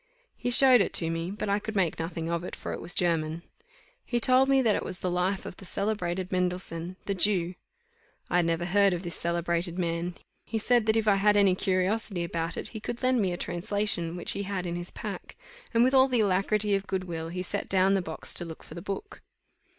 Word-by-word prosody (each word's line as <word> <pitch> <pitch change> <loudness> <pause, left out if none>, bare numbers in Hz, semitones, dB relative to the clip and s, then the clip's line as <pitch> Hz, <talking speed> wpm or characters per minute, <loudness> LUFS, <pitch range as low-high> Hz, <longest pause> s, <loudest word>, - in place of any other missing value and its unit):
He - - -3
showed 255 -1 +8
it - - -1
to 165 -1 +3
me; 165 +1 -3
but 205 +2 -4
I 200 +1 +1
could 220 +1 -6
make 180 -5 +1
nothing 165 0 -4
of 170 0 -2
it, - - -6
for - - -6
it - - -6
was 175 - -5
German. 165 -2 0 0.6
He 240 - -1
told 255 +3 +4
me 270 0 +5
that 220 -3 +3
it - - -1
was 180 - -3
the 180 - -1
Life 185 +2 -1
of - - -8
the - - -12
celebrated 190 -2 -2
Mendelssohn, 180 -1 -2
the 200 - -1
Jew. 185 -2 +1 0.7
I 175 - +1
had 175 -1 +2
never 165 +1 0
heard 200 +1 +4
of 175 - -6
this 170 -2 -5
celebrated 170 +1 -1
man. 170 0 -2 0.3
He 225 - -3
said 235 0 +2
that 220 +1 +3
if 220 -1 0
I 200 -2 +5
had 205 +1 +4
any 200 -2 +5
curiosity 185 0 0
about 170 0 -3
it, - - -4
he 220 - -7
could 235 +3 -6
lend 255 -2 +3
me 190 -3 +1
a 175 - -3
translation 175 -1 -2
which 175 - +2
he - - -1
had 195 -2 -3
in 170 -1 -3
his 175 0 -5
pack; - - -7 0.4
and 230 0 +4
with 260 +2 +3
all 265 0 +6
the 250 -3 +2
alacrity 205 +1 +1
of 195 0 -1
good 190 -1 -2
will, 165 -3 -5
he 180 +2 -4
set - - -3
down 190 0 +3
the 195 - +2
box 160 -2 -3
to - - 0
look 165 -2 -9
for - - -12
the 170 - -7
book. 205 - -6
185 Hz, 235 wpm, -28 LUFS, 170-210 Hz, 0.7 s, showed